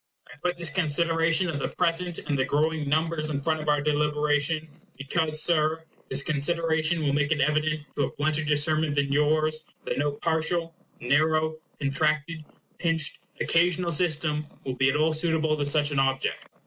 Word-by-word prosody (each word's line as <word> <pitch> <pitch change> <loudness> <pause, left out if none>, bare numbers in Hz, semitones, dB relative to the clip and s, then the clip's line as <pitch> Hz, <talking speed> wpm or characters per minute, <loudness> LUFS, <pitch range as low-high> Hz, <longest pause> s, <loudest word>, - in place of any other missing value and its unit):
I - - -17
put 180 0 -1
this 170 -2 +1
consideration 165 +1 +1
of 155 -4 -3
the - - -2
present 175 0 -1
and 145 - -1
the 135 - +1
growing 150 +2 0
numbers 155 0 0
in 145 - -2
the 140 - -6
front 155 0 0
of 155 - -3
our 145 -1 +2
deliberation, 150 +1 0 0.3
because, 155 +3 +1
Sir, 160 -1 +1 0.3
this 135 +1 +2
consideration 160 +1 0
will 140 -2 +1
make 145 0 0
it 155 - +1
evident 150 +2 0
to 145 - 0
a - - -6
blunter 155 +1 0
discernment 150 0 +1
than 140 -1 0
yours, 155 +2 +1 0.2
that - - -2
no 145 0 0
partial, 165 +2 -1 0.3
narrow, 155 +4 +1 0.2
contracted, 155 +3 0 0.4
pinched, 165 -3 +1 0.2
occasional 175 +1 +2
system 155 -2 +1 0.2
will 130 - -2
be 130 +1 +2
at 135 - 0
all 155 +1 +2
suitable 160 -1 +1
to 145 -1 -2
such 145 0 +2
an 140 - 0
object. 135 0 -1
155 Hz, 175 wpm, -26 LUFS, 145-160 Hz, 0.4 s, our